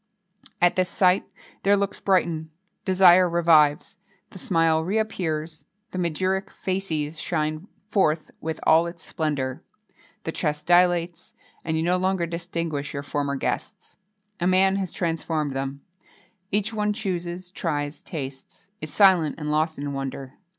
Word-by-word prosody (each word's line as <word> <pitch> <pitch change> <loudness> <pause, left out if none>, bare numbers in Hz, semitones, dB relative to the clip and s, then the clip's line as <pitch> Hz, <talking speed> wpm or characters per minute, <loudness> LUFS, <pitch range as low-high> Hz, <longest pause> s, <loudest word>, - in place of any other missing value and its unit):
At 175 +1 +3
this 185 -1 +2
sight, 185 +1 +3 0.4
their 200 +1 +4
looks 200 0 -2
brighten; 170 -4 +1 0.4
desire 185 -1 +6
revives; 165 +2 +3 0.3
the 190 - -11
smile 165 -3 +2
reappears; 165 -6 -2 0.3
the 185 - -4
magiric 185 +3 -1
facies 165 -5 -3
shines 155 +2 -2 0.2
forth 170 -7 +1
with 160 0 -4
all 165 +2 +5
its 170 -1 -9
splendour; 140 -5 -2 0.6
the 165 - -3
chest 150 -2 -2
dilates, 175 -1 +2 0.3
and 160 -1 -1
you 160 - 0
no 180 +2 +2
longer 185 -1 0
distinguish 170 -4 -4
your 140 - -3
former 145 -1 -2
guests. 135 - -4 0.4
A 175 - +1
man 190 +1 +4
has 190 -3 -3
transformed 160 -4 -2
them. 135 +1 -4 0.7
Each 210 +2 0
one 210 -1 0
chooses, 180 -4 -4
tries, 145 -5 -3
tastes 135 +5 -8
is 155 - -6
silent, 185 -7 +4
and 150 -1 -3
lost 155 +1 +1
in 140 0 -4
wonder. 135 0 -5
170 Hz, 135 wpm, -24 LUFS, 155-185 Hz, 0.7 s, desire